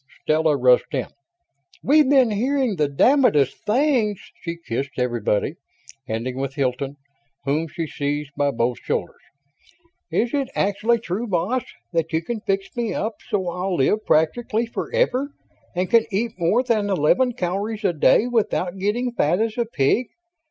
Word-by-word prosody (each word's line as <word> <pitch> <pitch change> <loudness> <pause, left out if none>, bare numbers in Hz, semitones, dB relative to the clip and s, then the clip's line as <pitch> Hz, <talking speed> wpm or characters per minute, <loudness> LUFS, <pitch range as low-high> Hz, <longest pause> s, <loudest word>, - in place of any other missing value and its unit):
Stella 155 -1 +2
rushed 125 +2 +3
in. 130 - -2 0.7
"We've 295 0 +4
been 265 -5 +5
hearing 255 +1 0
the 150 -1 +2
damnedest 150 - +3
things!" 235 -4 +2 0.2
She 170 0 -5
kissed 135 -3 -4
everybody, 120 +3 0 0.5
ending 120 +3 -3
with 135 0 -3
Hilton, 135 0 -1 0.5
whom 150 +4 0
she 165 +1 -4
seized 145 -1 -3
by 145 -1 +1
both 120 -2 -1
shoulders. - - -3 0.9
"Is 235 +1 0
it 275 -3 0
actually 210 +4 +1
true, 215 +4 -3
boss, 200 +7 0 0.3
that 165 -1 0
you 160 +1 +1
can 235 +4 -3
fix 195 0 -2
me 235 -3 -2
up 220 0 -2
so 190 -3 -1
I'll 180 +2 -2
live 190 +10 +2
practically 220 +8 +1
forever 280 - -1 0.4
and 180 +1 0
can 230 +4 +4
eat 220 +4 0
more 190 +9 +2
than 220 -5 0
eleven 200 - +2
calories 205 +4 -3
a 185 - +3
day 155 - +4
without 205 -6 -1
getting 235 +6 0
fat 175 -5 +1
as 220 0 0
a 235 - 0
pig? 220 - +1
195 Hz, 150 wpm, -22 LUFS, 150-235 Hz, 0.9 s, been